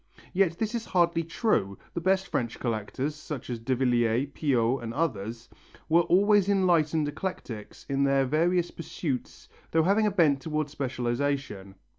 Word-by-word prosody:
Yet 180 -3 +2
this 220 +2 -2
is 235 -1 -2
hardly 170 -2 +2
true, 160 - 0 0.2
the 170 - -3
best 190 +2 +2
French 120 -2 -2
collectors, 120 +5 -2
such 150 -4 -7
as 120 - -3
Davilliers, 125 +1 +1
Piot 130 -3 +1
and 115 -1 -5
others, 115 -6 -2 0.4
were 165 +2 +5
always 200 +3 +4
enlightened 165 -6 +2
eclectics 135 - -6
in 140 0 +1
their 135 -1 +3
various 170 +5 +1
pursuits 150 -5 -5 0.2
though 160 0 +3
having 205 +5 +3
a - - +1
bent 155 -7 +3
towards 155 -1 -2
specialization. 130 -6 -2
145 Hz, 145 wpm, -27 LUFS, 120-170 Hz, 0.4 s, were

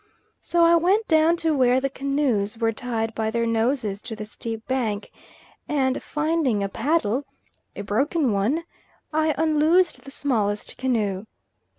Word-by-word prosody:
So 345 -1 +2
I 335 0 +6
went 390 +7 +2
down 320 +1 +4
to 315 -2 +3
where 255 -1 +4
the 275 - 0
canoes 270 -6 -1
were 225 -1 +1
tied 225 -1 -3
by 220 0 -1
their 230 +1 0
noses 225 -2 0
to 220 - -7
the 215 0 -6
steep 225 +1 -7
bank, 225 -6 -2 0.6
and 265 -3 +1
finding 300 -8 0
a 195 - -2
paddle, 280 0 0 0.5
a 200 - -5
broken 270 - +1
one, 220 +12 0 0.5
I 310 0 +2
unloosed 320 +3 +2
the 275 - -10
smallest 215 -8 -1
canoe. 215 -6 -1
255 Hz, 150 wpm, -24 LUFS, 220-310 Hz, 0.6 s, I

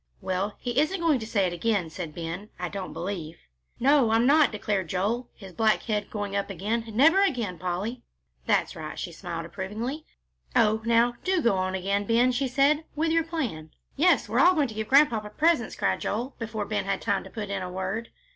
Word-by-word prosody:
"Well, 190 +2 -2
he 245 +1 -1
isn't 310 +6 +1
going 325 -6 +2
to 220 - -6
say 205 -4 +1
it 175 - -1
again," 180 -2 0
said 160 -2 -6
Ben, 170 +5 -5
"I - - -3
don't 195 -2 -5
believe." 170 -4 -5 0.4
"No, 275 -2 +4
I'm 225 +2 +3
not," 295 +2 +5
declared 205 -3 -2
Joel, 220 +7 -1
his 190 -3 -12
black 220 +3 +2
head 210 -3 -2
going 205 -2 -4
up 200 0 -1
again, 205 +5 -2
"never 320 - +5
again, 235 - -1
Polly." 190 +7 -3 0.5
"That's - - +1
right," - - -6
and - - -8
she - - -4
smiled 170 -3 -6
approvingly. 215 - -5 0.5
"Oh, 220 -2 +3
now, 235 +1 +3
do 375 -1 +2
go 235 -9 +3
on 185 0 -1
again, 200 +2 -1
Ben," 235 +4 +3
she 260 +2 0
said, 280 +4 +3
"with 320 +2 +1
your 330 0 +3
plan." 260 - -4 0.3
"Yes, 350 +5 +3
we're - - 0
all 365 +1 +6
going 290 -5 +1
to - - -7
give 215 0 -4
Grandpapa 240 -7 +4
presents," 315 -7 +2
cried 95 -1 0
Joel, 240 +6 -3
before 220 -2 -3
Ben 210 0 -2
had 195 -1 -1
time 200 -3 0
to - - -11
put 205 -3 -6
in 195 -1 -2
a 180 - -4
word. 190 +5 -4
220 Hz, 210 wpm, -26 LUFS, 190-255 Hz, 0.5 s, all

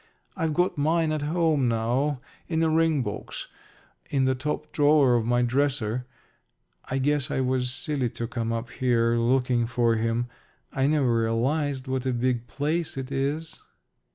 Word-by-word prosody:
I've 160 -4 -1
got 180 -2 +1
mine 160 +2 +2
at 155 -1 -1
home 155 -3 +1
now 125 +5 0 0.3
in 165 -1 0
a 160 - +2
ring 160 -3 +2
box 105 - -6 0.6
in 135 -2 +1
the 130 - +3
top 150 +3 -4
drawer 145 -3 +4
of 115 -2 +1
my 120 0 +3
dresser. 125 -2 0 0.8
I 130 - -2
guess 145 +1 +1
I - - -1
was 130 -1 0
silly 135 -1 -1
to 115 - -5
come 115 -1 -3
up 115 +1 -3
here 120 -2 +2
looking 120 0 +2
for 120 -1 +2
him. 115 +2 0 0.5
I 135 0 +1
never 135 -6 +2
realized 130 +4 0
what 130 0 -2
a 130 - +1
big 120 -1 0
place 155 +2 -2
it 135 0 -5
is." 145 +4 -2
130 Hz, 160 wpm, -26 LUFS, 120-150 Hz, 0.8 s, drawer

